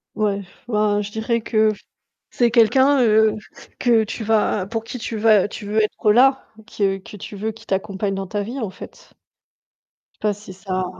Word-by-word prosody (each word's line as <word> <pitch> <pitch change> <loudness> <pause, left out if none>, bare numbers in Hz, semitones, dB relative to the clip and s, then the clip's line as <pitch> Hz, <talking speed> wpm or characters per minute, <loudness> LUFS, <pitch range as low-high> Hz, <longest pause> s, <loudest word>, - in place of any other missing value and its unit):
Ouais, 205 -2 0 0.3
bah 210 -2 +1
je 205 - -5
dirais 225 +2 -1
que 215 -1 +2
f 200 - -15 0.5
c'est 240 -1 +2
quelqu'un, 260 +4 +4
heu, 220 -1 +4 0.4
que 230 -3 +3
tu 220 +1 -6
vas 210 -3 +1
pour 225 +2 -3
qui 240 +3 -7
tu 225 0 -5
vas 210 -2 +4
tu 210 0 -8
veux 215 +2 +1
être 210 0 +1
là. 265 +4 +4 0.2
Que 195 -3 0
que 195 +2 -12
tu 205 - -9
veux 220 +2 -3
qu'il 220 - -17
t'accompagne 195 +1 -2
dans 195 0 -4
ta 205 +2 -3
vie, 240 +7 -6
en 220 -7 -3
fait. - - -13 1.1
Pas 210 -1 +1
si 205 -2 -11
ça 185 -1 -3
215 Hz, 185 wpm, -21 LUFS, 200-225 Hz, 1.1 s, quelqu'un